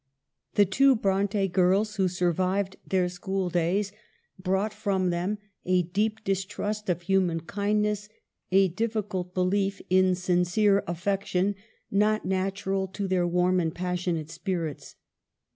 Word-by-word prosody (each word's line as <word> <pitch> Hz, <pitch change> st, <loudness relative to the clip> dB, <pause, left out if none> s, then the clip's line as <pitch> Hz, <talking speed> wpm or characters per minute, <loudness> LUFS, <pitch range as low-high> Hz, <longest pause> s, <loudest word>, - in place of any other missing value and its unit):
The 205 Hz, -, +6 dB
two 270 Hz, +8 st, +4 dB
Bronte 200 Hz, -1 st, +1 dB
girls 195 Hz, +4 st, +2 dB
who 190 Hz, -1 st, +3 dB
survived 185 Hz, +2 st, 0 dB
their 185 Hz, -2 st, +2 dB
school 185 Hz, +1 st, -2 dB
days 180 Hz, +4 st, +1 dB, 0.5 s
brought 190 Hz, +3 st, 0 dB
from 195 Hz, -4 st, 0 dB
them 180 Hz, +5 st, -1 dB, 0.3 s
a 180 Hz, 0 st, +2 dB
deep 210 Hz, +5 st, -1 dB
distrust 205 Hz, +2 st, -2 dB
of 175 Hz, -1 st, 0 dB
human 180 Hz, -3 st, +1 dB
kindness, 210 Hz, +3 st, -1 dB, 0.4 s
a 195 Hz, 0 st, +5 dB
difficult 205 Hz, -2 st, -3 dB
belief 195 Hz, +2 st, +1 dB
in 185 Hz, 0 st, +4 dB
sincere 185 Hz, +3 st, +2 dB
affection, 190 Hz, +2 st, 0 dB, 0.4 s
not 210 Hz, +2 st, +2 dB
natural 190 Hz, +1 st, -1 dB
to 195 Hz, +1 st, -4 dB
their 180 Hz, -2 st, +1 dB
warm 180 Hz, +1 st, +2 dB
and 165 Hz, -2 st, -1 dB
passionate 175 Hz, -3 st, -2 dB
spirits. 170 Hz, -7 st, -4 dB
190 Hz, 125 wpm, -27 LUFS, 180-205 Hz, 0.5 s, The